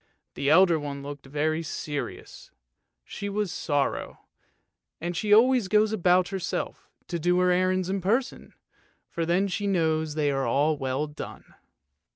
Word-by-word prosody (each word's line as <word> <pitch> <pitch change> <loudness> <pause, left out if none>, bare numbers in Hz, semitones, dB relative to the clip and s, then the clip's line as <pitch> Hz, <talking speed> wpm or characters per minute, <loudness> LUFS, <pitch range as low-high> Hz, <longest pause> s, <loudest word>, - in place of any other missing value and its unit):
The 140 - -1
elder 170 0 +5
one 140 -1 -6
looked 140 -1 -8
very 155 +3 -1
serious; 150 -2 -6 0.5
she 200 - -6
was 205 -2 -2
Sorrow, 145 -2 -2 0.8
and 175 +2 -4
she 205 +4 -2
always 240 0 +5
goes 215 +2 +3
about 180 -2 +3
herself, 190 -2 -4 0.2
to 170 - -3
do 175 +2 +2
her 180 0 +3
errands 185 0 +1
in 195 0 -2
person, 230 +8 -1 0.5
for 165 -1 -3
then 180 +4 +2
she 200 +2 -2
knows 160 -4 0
they 150 -2 +1
are 140 +3 +1
well 135 0 -2
done. 150 0 -10
170 Hz, 145 wpm, -26 LUFS, 150-190 Hz, 0.8 s, elder